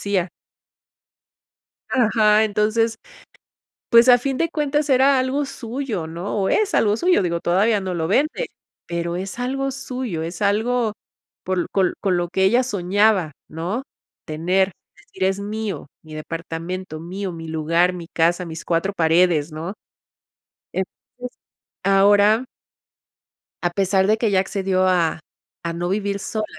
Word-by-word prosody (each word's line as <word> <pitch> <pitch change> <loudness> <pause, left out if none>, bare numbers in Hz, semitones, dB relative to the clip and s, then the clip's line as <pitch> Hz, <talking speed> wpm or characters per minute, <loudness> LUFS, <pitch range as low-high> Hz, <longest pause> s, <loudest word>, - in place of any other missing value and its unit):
decía. 190 -3 0 1.6
Ajá. 220 -3 +4
Entonces, 220 +2 +1 1.0
pues, 235 +1 +7
a 245 - +9
fin 265 +1 -2
de 330 - +1
cuentas, 295 -1 -1
era 270 +1 +5
algo 265 +3 0
suyo, 235 -8 -4
¿no?, 170 +6 -5
o 190 - +1
es 425 -2 +1
algo 210 0 +3
suyo, 355 - +3
digo, 170 -1 -1
todavía 200 +4 +2
no 190 -1 -3
lo 165 -1 -2
vende, 305 - +1 0.4
pero 170 0 -3
es 190 +5 -5
algo 270 +2 -1
suyo, 250 -9 -4
es 170 +3 -6
algo 220 +2 +1 0.5
por 185 -1 -1
con 190 -3 +1
con 190 -3 +1
lo 175 0 -1
que 190 +2 +1
ella 240 +6 +4
soñaba, 200 - +1 0.2
¿no?, 180 +11 -3 0.4
tener, 180 +5 +1 0.2
decir: 185 +3 -6
"Es 195 +1 +1
mío, 210 -6 -4
mi 155 -1 -11
departamento, 165 +2 -5
mío, 185 +3 -5
mi 165 -1 -8
lugar, 165 +3 +2
mi 170 -2 -8
casa, 175 +2 +1
mis 160 0 -7
cuatro 175 +4 0
paredes", 165 -2 +3
¿no?, 165 +6 -5 1.0
entonces 245 +6 -7 0.5
ahora 205 +4 +4 1.2
a 175 - +2
pesar 190 +1 +2
de 215 +1 +3
que 220 -2 0
ya 190 - +4
accedió 190 -1 0
a 170 -3 +2 0.4
a 170 0 -3
no 175 +1 -3
vivir 200 0 -1
sola, 215 +2 -3
195 Hz, 140 wpm, -21 LUFS, 175-225 Hz, 1.6 s, a